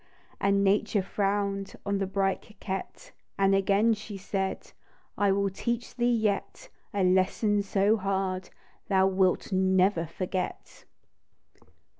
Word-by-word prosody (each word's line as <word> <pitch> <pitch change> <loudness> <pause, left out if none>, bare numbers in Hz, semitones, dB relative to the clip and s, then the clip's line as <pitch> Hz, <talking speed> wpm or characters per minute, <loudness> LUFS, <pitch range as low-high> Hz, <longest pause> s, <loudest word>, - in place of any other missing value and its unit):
And 200 0 +2
Nature 205 0 +2
frown'd 200 0 -1
On 200 0 0
the 195 - -1
bright 195 0 0
coquette, 210 - -7 0.3
And 195 0 +3
again 200 +3 +3
she 210 -1 -7
said 190 0 -3
— - - -33
" - - -40
I 200 -1 +2
will 200 0 +1
teach 235 +4 -3
thee 245 0 +2
yet, 215 -4 -1 0.2
A 200 -1 0
lesson 190 +3 +2
so 200 +2 +2
hard 190 -2 -2 0.4
Thou 190 -1 +3
wilt 190 0 +1
never 185 -2 +2
forget 180 +2 -5
195 Hz, 130 wpm, -28 LUFS, 190-205 Hz, 0.4 s, And